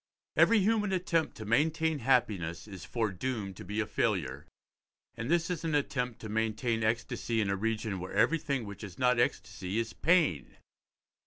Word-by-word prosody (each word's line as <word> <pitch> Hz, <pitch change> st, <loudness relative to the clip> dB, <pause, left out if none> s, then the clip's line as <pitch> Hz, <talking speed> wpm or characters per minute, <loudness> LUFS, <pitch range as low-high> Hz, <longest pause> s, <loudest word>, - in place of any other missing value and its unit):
Every 230 Hz, -, +6 dB
human 210 Hz, 0 st, +2 dB
attempt 175 Hz, -3 st, 0 dB
to 110 Hz, -, -7 dB
maintain 155 Hz, +6 st, +2 dB
happiness 105 Hz, -10 st, +1 dB
is 95 Hz, -4 st, -9 dB
foredoomed 110 Hz, -2 st, -2 dB
to -, -, -8 dB
be 105 Hz, +4 st, -3 dB
a 110 Hz, -, +1 dB
failure, 95 Hz, -, -1 dB, 0.7 s
and 115 Hz, -, -5 dB
this 170 Hz, +1 st, +2 dB
is 170 Hz, -3 st, -3 dB
an 160 Hz, -2 st, 0 dB
attempt 125 Hz, -5 st, -1 dB
to 110 Hz, -, -6 dB
maintain 110 Hz, +1 st, 0 dB
ecstasy 115 Hz, +1 st, -1 dB
in 100 Hz, -3 st, +1 dB
a -, -, +1 dB
region 110 Hz, -1 st, -2 dB
where 90 Hz, +1 st, -6 dB
everything 140 Hz, +3 st, +1 dB
which 100 Hz, +1 st, -8 dB
is 95 Hz, -4 st, -8 dB
not 125 Hz, -1 st, +3 dB
ecstasy 90 Hz, -2 st, -1 dB
is 115 Hz, -1 st, -1 dB
pain. 160 Hz, -, +2 dB
115 Hz, 165 wpm, -31 LUFS, 105-150 Hz, 0.7 s, Every